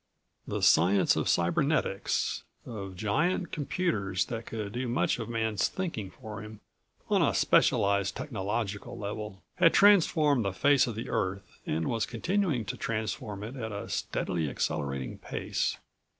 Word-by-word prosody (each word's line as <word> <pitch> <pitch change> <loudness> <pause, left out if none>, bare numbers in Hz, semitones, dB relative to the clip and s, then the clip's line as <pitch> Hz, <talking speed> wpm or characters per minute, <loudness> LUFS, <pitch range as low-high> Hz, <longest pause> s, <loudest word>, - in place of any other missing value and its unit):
The - - -3
science 95 +4 +5
of - - 0
cybernetics, 100 - +1 0.2
of 100 -5 -7
giant 150 - 0
computers 140 - -1
that 115 -1 -6
could 105 -3 -4
do 125 +3 -3
much 120 +1 +1
of 115 - -5
Man's 110 -3 0
thinking 160 - -4
for 110 -2 -9
him 105 0 -10 0.5
on - - +3
a - - +2
specialized 100 -1 +3
technological 105 -4 -3
level, 105 -1 -6
had 170 -2 +5
transformed 160 - +5
the 100 -2 -1
face 140 +8 +4
of 115 - -4
the 115 - -5
Earth 95 +1 -3
and 80 +1 -1
was 115 -2 0
continuing 160 - 0
to - - -4
transform 110 -2 -3
it 115 +5 -6
at 115 -4 -4
a 100 0 -6
steadily 80 -4 -2
accelerating 70 -1 -3
pace. - - -2
110 Hz, 145 wpm, -29 LUFS, 100-130 Hz, 0.5 s, science